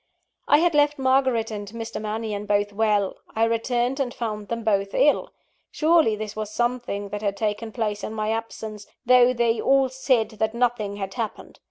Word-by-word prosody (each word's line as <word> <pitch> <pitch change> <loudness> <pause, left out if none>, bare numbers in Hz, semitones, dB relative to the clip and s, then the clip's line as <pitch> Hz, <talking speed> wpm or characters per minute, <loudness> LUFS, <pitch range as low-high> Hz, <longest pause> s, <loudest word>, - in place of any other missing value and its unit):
I 290 - +6
had 340 +2 +2
left 295 0 +3
Margaret 260 -4 +2
and 205 -1 -5
Mr. 230 -1 -5
Mannion 215 -1 -4
both 205 0 +1
well 205 -2 +1 0.2
I 225 - +2
returned, 240 +3 0
and 260 -3 -1
found 215 -4 -4
them 230 +1 -4
both 200 -2 0
ill. 295 - +3 0.4
Surely 315 -8 +3
this 210 0 -6
was 215 -1 -4
something 240 -3 -2
that 205 +1 -5
had 200 -2 -1
taken 215 +1 -2
place 210 -3 -2
in 220 - -5
my 215 0 -1
absence, 220 -2 -5 0.2
though 250 0 +6
they 235 -2 +1
all 270 -1 +3
said 260 -3 +1
that 220 +1 0
nothing 235 -4 0
had 195 -1 -5
happened. 230 -3 -6
225 Hz, 180 wpm, -24 LUFS, 210-250 Hz, 0.4 s, I